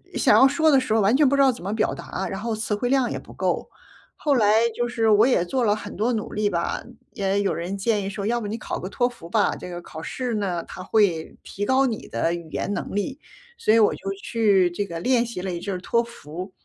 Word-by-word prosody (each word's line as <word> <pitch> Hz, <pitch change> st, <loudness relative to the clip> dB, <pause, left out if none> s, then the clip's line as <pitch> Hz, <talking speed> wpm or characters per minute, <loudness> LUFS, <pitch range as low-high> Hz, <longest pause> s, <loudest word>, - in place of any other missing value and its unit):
想 -, -, +4 dB
要 265 Hz, -, +8 dB
说 315 Hz, +3 st, +3 dB
的 275 Hz, -, +6 dB
时 255 Hz, -4 st, -1 dB
候 220 Hz, -, +3 dB
完 205 Hz, +5 st, +4 dB
全 290 Hz, +1 st, +5 dB
不 275 Hz, -, +3 dB
知 275 Hz, -, +4 dB
道 270 Hz, -, +6 dB
怎 240 Hz, -, -10 dB
么 200 Hz, +3 st, -2 dB
表 220 Hz, -, 0 dB
达， 190 Hz, +1 st, -5 dB
然 195 Hz, -, -4 dB
后 225 Hz, 0 st, -2 dB
词 215 Hz, -1 st, -2 dB
汇 245 Hz, +4 st, -2 dB
量 265 Hz, -2 st, +2 dB
也 -, -, -2 dB
不 -, -, -14 dB
够。 -, -, -1 dB, 0.5 s
后 290 Hz, -2 st, +2 dB
来 220 Hz, 0 st, +4 dB
就 240 Hz, -, 0 dB
是 230 Hz, -2 st, +1 dB
我 210 Hz, +1 st, +6 dB
也 245 Hz, -9 st, +2 dB
做 250 Hz, +8 st, -1 dB
了 210 Hz, -3 st, +3 dB
很 -, -, -8 dB
多 225 Hz, +4 st, +1 dB
努 220 Hz, -3 st, -3 dB
力 210 Hz, 0 st, +1 dB
吧， -, -, -2 dB, 0.3 s
也 200 Hz, -4 st, 0 dB
有 200 Hz, -, 0 dB
人 180 Hz, +4 st, -4 dB
建 205 Hz, 0 st, 0 dB
议 195 Hz, -, -3 dB
说 200 Hz, 0 st, -5 dB
要 240 Hz, +1 st, 0 dB
不 210 Hz, -, -4 dB
你 215 Hz, +2 st, -3 dB
考 -, -, -4 dB
个 185 Hz, -, -6 dB
托 245 Hz, +3 st, +1 dB
福 235 Hz, -9 st, -10 dB
吧。 210 Hz, +2 st, +2 dB
这 180 Hz, -, -8 dB
个 175 Hz, 0 st, -6 dB
考 160 Hz, -2 st, -9 dB
试 250 Hz, +7 st, -3 dB
呢， 190 Hz, -5 st, -1 dB
它 185 Hz, -, -8 dB
会 185 Hz, -7 st, +1 dB
提 205 Hz, -, -5 dB
高 260 Hz, +4 st, +3 dB
你 230 Hz, -4 st, -3 dB
的 140 Hz, +9 st, 0 dB
语 170 Hz, -2 st, -6 dB
言 205 Hz, -, -2 dB
能 -, -, -4 dB
力， 205 Hz, +7 st, -2 dB, 0.4 s
所 215 Hz, -, +2 dB
以 230 Hz, -, +6 dB
我 210 Hz, -, +4 dB
就 195 Hz, -, -5 dB
去 200 Hz, -6 st, +3 dB
这 200 Hz, +4 st, -2 dB
个 170 Hz, -3 st, -6 dB
练 245 Hz, +5 st, +2 dB
习 230 Hz, -6 st, -6 dB
了 185 Hz, -1 st, -3 dB
一 170 Hz, -, -5 dB
阵 200 Hz, -, -3 dB
儿 180 Hz, -, -4 dB
托 235 Hz, +6 st, +1 dB
福， 185 Hz, -5 st, -8 dB
210 Hz, 290 characters per minute, -24 LUFS, 190-240 Hz, 0.5 s, 要